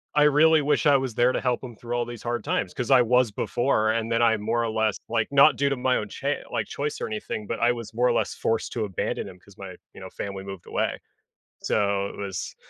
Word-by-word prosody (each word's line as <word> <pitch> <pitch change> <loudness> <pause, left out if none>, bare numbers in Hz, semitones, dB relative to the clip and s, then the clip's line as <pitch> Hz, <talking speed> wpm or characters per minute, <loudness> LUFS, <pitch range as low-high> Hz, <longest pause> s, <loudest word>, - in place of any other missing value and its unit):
I 150 - +5
really 150 +2 +5
wish 150 - +1
I 145 -1 +6
was 130 -3 -3
there 120 +1 +4
to - - -2
help 125 -1 -1
him 120 -3 -8
through 120 +2 -5
all 120 0 0
these 120 -2 -9
hard 120 -2 -2
times 90 - -1
'cause 125 - -4
I 130 -2 +7
was 125 -1 +3
before, 110 0 +1
and 115 0 -2
then 115 0 +2
I 115 -1 +4
more 115 +3 -1
or 115 - -1
less 110 -1 0
like, 115 -1 0
not 140 +2 +6
due 140 0 +1
to 140 - 0
my 130 0 +1
own, 105 - -3 0.4
like, - - -1
cha - - -9
choice 145 +1 -2
or - - -1
anything, 105 0 -5
but 115 - -3
I 120 - +4
was 115 -2 -6
more 120 +2 +2
or 120 - +2
less - - 0
forced 115 +2 -2
abandon 105 -5 -2
him 90 -1 -14
'cause 100 +1 -20
my, 95 -2 -8 0.2
you - - -12
know, - - -8
family 100 -1 -6
moved 95 -2 -9
away. - - -2 0.6
So, 100 -1 +1
it - - -11
was 100 -3 -5
115 Hz, 255 wpm, -25 LUFS, 105-125 Hz, 0.6 s, I